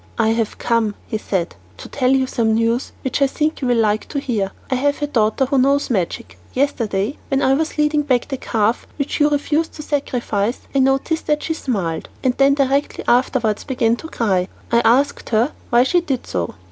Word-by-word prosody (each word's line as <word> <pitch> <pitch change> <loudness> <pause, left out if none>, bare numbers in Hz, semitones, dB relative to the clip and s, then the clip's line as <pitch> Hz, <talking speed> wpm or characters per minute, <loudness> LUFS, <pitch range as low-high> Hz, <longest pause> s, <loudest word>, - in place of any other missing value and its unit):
"I 220 -1 +3
have 225 -1 -1
come," 230 -3 0
he 220 - -3
said, 185 -4 -2 0.2
"to - - -9
tell 255 -3 0
you 265 0 +3
some 225 -3 +1
news 230 +2 0
which 265 +2 -2
I 275 - +5
think 305 +3 -1
you 260 - 0
will 245 -1 +2
like 215 -1 +1
to 285 - -3
hear. 215 -8 -1 0.2
I - - +3
have 285 +3 +1
a 295 - 0
daughter 240 -1 +1
who 270 +1 +1
knows 275 +1 +2
magic. 165 - -2
Yesterday, 235 -4 -1
when 275 -1 0
I 265 - +4
was 310 +3 -1
leading 300 0 +2
back 260 -4 +1
the 270 - -3
calf 225 -1 0
which 280 +1 -2
you 295 0 +4
refused 295 +2 0
to 300 - -8
sacrifice, 240 -6 -1
I 275 - +2
noticed 270 +5 +1
that 300 0 +1
she 320 - -1
smiled, 195 - -3
and 255 -2 +2
then 275 0 +4
directly 275 0 0
afterwards 240 -3 +2
began 235 -4 +1
to 320 - -8
cry. 190 - 0 0.2
I 235 - +5
asked 250 +5 +2
her 235 +5 +2 0.2
why 240 0 +5
she 350 +7 +2
did 275 -7 -3
so." 90 -2 -3
255 Hz, 205 wpm, -20 LUFS, 225-280 Hz, 0.2 s, I